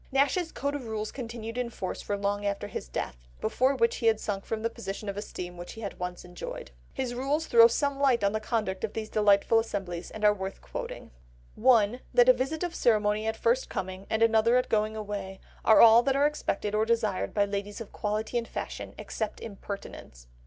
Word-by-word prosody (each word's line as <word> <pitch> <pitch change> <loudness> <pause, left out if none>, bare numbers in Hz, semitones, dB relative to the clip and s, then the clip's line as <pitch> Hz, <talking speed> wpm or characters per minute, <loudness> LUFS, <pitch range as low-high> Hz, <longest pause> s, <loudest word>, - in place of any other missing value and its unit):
Nash's 285 +5 +2
code 280 +1 -2
of 275 -5 -5
rules 215 -1 -3
continued 230 -2 -6
in 245 -1 -1
force 190 -5 -5
for 205 - -2
long 200 0 -1
after 200 0 -2
his 190 - -6
death, - - -4 0.2
before 260 - +1
which 230 -2 +2
he 230 - 0
had 220 -1 +4
sunk 195 -2 -3
from 220 -1 -3
the 230 - +1
position 210 -2 -6
of 200 - -3
esteem 180 -3 -6
which 175 0 -8
he 225 - -10
had 200 - -6
once 180 0 -5
enjoyed. - - -7 0.2
His 260 -2 -3
rules 280 +6 -1
throw 230 -4 +8
some 280 +3 -1
light 260 -5 +3
on 200 - +3
the 220 - -1
conduct 215 -4 -2
of 220 - -2
these 220 -1 -5
delightful 210 +1 +4
assemblies, 185 -6 -4
and 215 -1 -3
are 210 - +7
worth 190 -1 -6
quoting— - - -7 0.4
1. 235 -1 +4 0.2
That 245 0 +7
a - - +10
visit 270 +7 -2
of 350 -1 -2
ceremony 215 -3 +2
at 220 0 -1
first 235 +4 +1
coming, 185 +1 -5
and 220 +1 +2
another 230 +2 +4
at 250 - 0
going 215 0 +1
away, 200 -3 -5 0.2
are 220 - +7
all 230 +1 +9
that 270 +2 +1
are 280 +1 +4
expected 210 -8 -1
or 215 +1 +2
desired 225 -4 0
by 205 -1 +2
ladies 200 0 -4
of 230 - -8
quality 215 +3 -1
and 230 - -6
fashion—except 220 -2 -5
impertinents. 200 - -8
220 Hz, 210 wpm, -28 LUFS, 200-240 Hz, 0.4 s, a